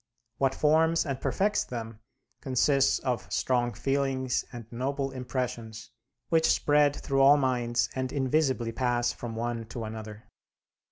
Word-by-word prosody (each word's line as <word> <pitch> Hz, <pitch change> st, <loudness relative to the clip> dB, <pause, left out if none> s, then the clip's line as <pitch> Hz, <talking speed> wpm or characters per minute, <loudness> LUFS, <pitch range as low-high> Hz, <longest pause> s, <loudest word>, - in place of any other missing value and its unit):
What 135 Hz, -1 st, +2 dB
forms 160 Hz, +2 st, +3 dB
and 135 Hz, -3 st, -4 dB
perfects 205 Hz, +2 st, +1 dB
them 115 Hz, -3 st, -7 dB, 0.4 s
consists 135 Hz, +1 st, +2 dB
of 125 Hz, -2 st, -3 dB
strong 120 Hz, -2 st, +1 dB
feelings 135 Hz, -2 st, -1 dB
and 120 Hz, -2 st, -8 dB
noble 135 Hz, +3 st, -2 dB
impressions 125 Hz, -4 st, -5 dB, 0.4 s
which 160 Hz, -1 st, +3 dB
spread 145 Hz, -1 st, +3 dB
through 135 Hz, -2 st, 0 dB
all 140 Hz, +2 st, +7 dB
minds 125 Hz, -3 st, +1 dB
and 130 Hz, -1 st, -3 dB
invisibly 130 Hz, -3 st, 0 dB
pass 120 Hz, 0 st, 0 dB
from 115 Hz, -2 st, -7 dB
one 115 Hz, 0 st, -3 dB
to 115 Hz, 0 st, -6 dB
another. 110 Hz, -1 st, -7 dB
130 Hz, 130 wpm, -28 LUFS, 120-140 Hz, 0.4 s, all